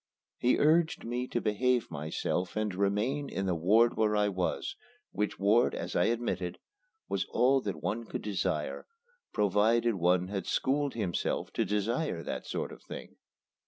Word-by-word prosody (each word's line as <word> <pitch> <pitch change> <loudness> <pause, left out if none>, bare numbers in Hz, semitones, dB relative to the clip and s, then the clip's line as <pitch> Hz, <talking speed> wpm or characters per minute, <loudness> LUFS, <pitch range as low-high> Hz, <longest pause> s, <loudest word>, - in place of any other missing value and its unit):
He 125 - +3
urged 160 +2 +3
me 125 +2 -2
to - - -1
behave 120 +2 +1
myself 80 +4 -2
and 105 -2 -1
remain 105 +9 0
in 95 - -2
the 95 - +1
ward 105 +8 +4
where 110 -1 +2
I 105 0 +3
was, 95 - -2 0.4
which 105 0 -2
ward, 110 +5 +3
as 85 +1 -5
I 90 - +4
admitted, 110 -7 -1 0.5
was - - -1
all 135 +2 +3
that 100 -5 -5
one 115 +2 -2
could - - -5
desire 90 -7 -2 0.4
provided 110 +4 +3
one 90 0 +2
had 100 -1 -3
schooled 140 +1 0
himself 100 -7 -2
to 115 - +1
desire 105 - -1
that - - -5
sort - - -3
of - - -11
thing. - - -9
105 Hz, 160 wpm, -30 LUFS, 95-120 Hz, 0.5 s, ward